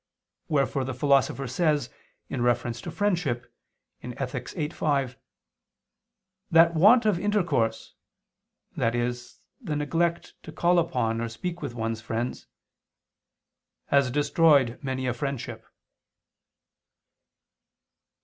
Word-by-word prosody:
Wherefore 140 -2 +1
the 130 0 -4
Philosopher 135 0 +2
says, 150 0 0 0.4
in 130 - -4
reference 120 -1 0
to - - -6
friendship 175 - -1 0.5
(Ethic. 125 0 -5
viii, 150 -4 -3
5) 140 -6 -1 1.3
"that 165 +1 +6
want 215 +9 +6
of 205 -5 +2
intercourse," 180 - 0 0.8
i.e. 120 +1 +1 0.5
the 150 - -3
neglect 165 +3 -1
to - - -10
call 175 0 +3
upon 115 -9 0
or 115 - -2
speak 175 +10 -5
with 135 -5 -5
one's 115 -1 -3
friends, 115 +2 -4 1.4
"has 140 -2 +3
destroyed 145 -2 +3
many 130 -2 -3
a 125 - 0
friendship." 120 -4 -5
135 Hz, 100 wpm, -26 LUFS, 120-165 Hz, 1.4 s, that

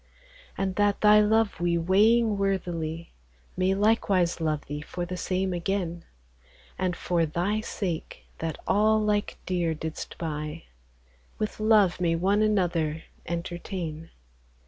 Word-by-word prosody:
And 190 -1 -2
that 205 -1 +2
Thy 210 0 +7
love 220 -1 +2
we 175 -1 +1
weighing 210 +6 +4
worthily, 170 -4 -2 0.4
May 185 +1 +2
likewise 195 -5 +2
love 155 -2 -1
Thee 145 +1 -5
for 175 +3 -5
the 180 +1 -5
same 185 +1 -1
again, 175 -1 -2 0.7
And 185 -1 -1
for 175 -2 0
Thy 180 +7 0
sake, 185 -7 -4
that 165 -1 -3
all 215 +2 +3
lyke 210 -1 0
deare 175 -3 0
didst 160 +1 -6
buy, 155 0 -4 0.7
With 215 0 -3
Love 215 -5 +4
may 165 -1 +2
one 195 +5 +2
another 175 -7 +1 0.2
entertayne 170 -1 -5
180 Hz, 125 wpm, -27 LUFS, 165-205 Hz, 0.7 s, Thy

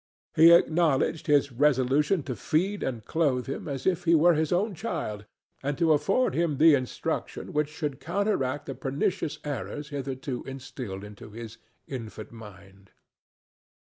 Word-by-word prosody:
He 165 +2 +8
acknowledged 165 -2 +3
his 145 -2 +3
resolution 140 +5 +2
to 125 - -4
feed 185 - 0
and 120 -5 -3
clothe 140 -6 +1
him 135 - -5
as 140 -2 -4
if 180 -2 +1
he 170 0 +5
were 170 +3 +5
his 155 -1 0
own 195 +4 +1
child, 155 - -4 0.4
and 140 +1 -2
to 165 -2 +4
afford 195 - +2
him 165 -4 0
the 160 +2 +7
instruction 130 -3 -2
which 150 0 +1
should 150 -3 -4
counteract 160 -5 -1
the 135 - -5
pernicious 140 +6 -2
errors 145 +1 -5
hitherto 135 -2 -4
instilled 130 -7 -7
into 105 0 -11
his 115 +1 -9 0.3
infant 115 -5 -7
mind. 100 -3 -14
145 Hz, 150 wpm, -27 LUFS, 125-165 Hz, 0.4 s, He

